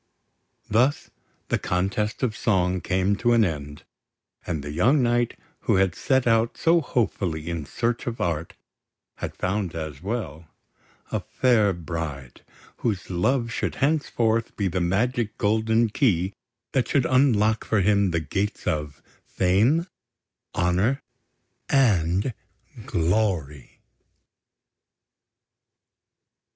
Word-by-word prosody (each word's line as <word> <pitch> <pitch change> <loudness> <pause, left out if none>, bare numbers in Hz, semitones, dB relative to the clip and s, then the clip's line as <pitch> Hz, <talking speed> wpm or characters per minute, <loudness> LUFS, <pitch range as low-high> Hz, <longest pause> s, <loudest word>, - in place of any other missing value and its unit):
Thus 125 +7 +1 0.4
the - - +1
Contest 100 +5 -1
of 115 -4 0
Song 95 -6 +1
came 95 +3 +1
to 120 +1 +2
an 115 -2 +5
end; 75 -3 -5 0.6
and 80 -5 -2
the 75 - -5
young 125 - +3
knight 120 0 +1 0.2
who - - +1
had 95 -2 +3
set 130 -2 +1
out 115 0 +2
so 165 +1 +3
hopefully 95 - -1
in 80 -4 -4
search 120 +1 -2
of 120 -1 -3
Art, 80 -1 -2 0.6
had - - -5
found 95 -2 -2
as 80 -3 -5
well 90 - -4 0.6
a - - 0
fair 115 -6 +2
bride, 80 -6 -6 0.3
whose 100 -5 -2
love 115 +7 +1
should - - -2
henceforth 120 -6 0
be 100 - 0
the 90 0 -1
magic 110 +5 0
golden 110 +2 +2
key 100 - +1 0.4
that 125 -4 +1
should 135 -3 +2
unlock 115 -5 +3
for 110 -2 +1
him 100 0 +3
the 85 -1 0
gates 95 +7 -3
of 75 -2 -3 0.2
Fame, 110 - +2 0.7
Honour, 95 +10 +1 0.7
and 100 - +2 0.5
Glory. 85 - -1
100 Hz, 115 wpm, -25 LUFS, 85-120 Hz, 0.7 s, an